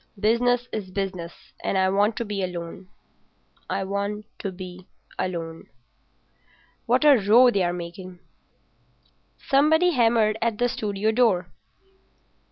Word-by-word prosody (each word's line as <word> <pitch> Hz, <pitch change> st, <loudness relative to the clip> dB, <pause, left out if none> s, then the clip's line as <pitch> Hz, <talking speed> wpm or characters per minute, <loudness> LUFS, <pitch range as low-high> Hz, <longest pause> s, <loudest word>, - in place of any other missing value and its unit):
Business 245 Hz, +3 st, +2 dB
is 205 Hz, -4 st, -5 dB
business, 185 Hz, -3 st, -6 dB
and -, -, 0 dB
I 190 Hz, 0 st, +3 dB
want 205 Hz, +3 st, +2 dB
to 235 Hz, -, -3 dB
be 205 Hz, -2 st, -3 dB
alone—I 180 Hz, +2 st, -8 dB
want 200 Hz, +2 st, -3 dB
to 195 Hz, -, -4 dB
be 185 Hz, 0 st, -10 dB, 0.3 s
alone. 165 Hz, -3 st, -4 dB, 1.2 s
What 250 Hz, +5 st, +2 dB
a 290 Hz, -3 st, +7 dB
row 230 Hz, +4 st, +5 dB
they're 185 Hz, -5 st, +1 dB
making!" 175 Hz, +1 st, -8 dB, 1.2 s
Somebody 315 Hz, +6 st, +3 dB
hammered 225 Hz, -5 st, +2 dB
at 230 Hz, -2 st, 0 dB
the 245 Hz, +2 st, +1 dB
studio 210 Hz, -1 st, -1 dB
door. 220 Hz, -6 st, +1 dB
205 Hz, 115 wpm, -24 LUFS, 185-235 Hz, 1.2 s, a